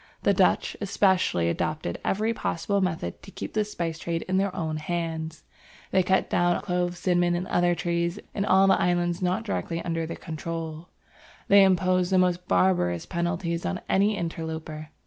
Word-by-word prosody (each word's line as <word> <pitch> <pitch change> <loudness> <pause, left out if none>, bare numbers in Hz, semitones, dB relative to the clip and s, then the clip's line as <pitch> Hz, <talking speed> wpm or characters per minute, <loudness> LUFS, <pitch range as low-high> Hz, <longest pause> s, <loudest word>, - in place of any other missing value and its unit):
The - - +4
Dutch, - - +2
especially, 190 - +2
adopted 155 - -2
every 215 +3 0
possible 200 0 -1
method 165 - -2
to - - -12
keep - - -7
the 215 - +2
spice 170 -6 -4
trade 165 0 -2
in 185 0 -1
their 195 0 +1
own 160 -2 -2
hands. 160 0 -4 0.5
They 190 - +4
cut 190 +1 +2
down 175 0 +2
the - - -3
clove, 180 -2 -1
cinnamon, 175 -1 +2
and 175 +1 -2
other 175 0 +2
trees, 170 +1 -1 0.2
in 200 - -1
all 190 -1 +5
the 195 0 +4
islands 175 0 +1
not 180 +1 0
directly 95 - -3
under 165 -1 -2
their 165 - -6
control. 165 +1 -6 0.6
They 200 0 +8
imposed 185 -1 +2
the 190 - +4
most 180 -1 +1
barbarous 90 -2 +2
penalties 170 0 -2
on 185 - -2
any 200 +2 +2
interloper. 160 -2 -5
175 Hz, 170 wpm, -26 LUFS, 160-185 Hz, 0.6 s, They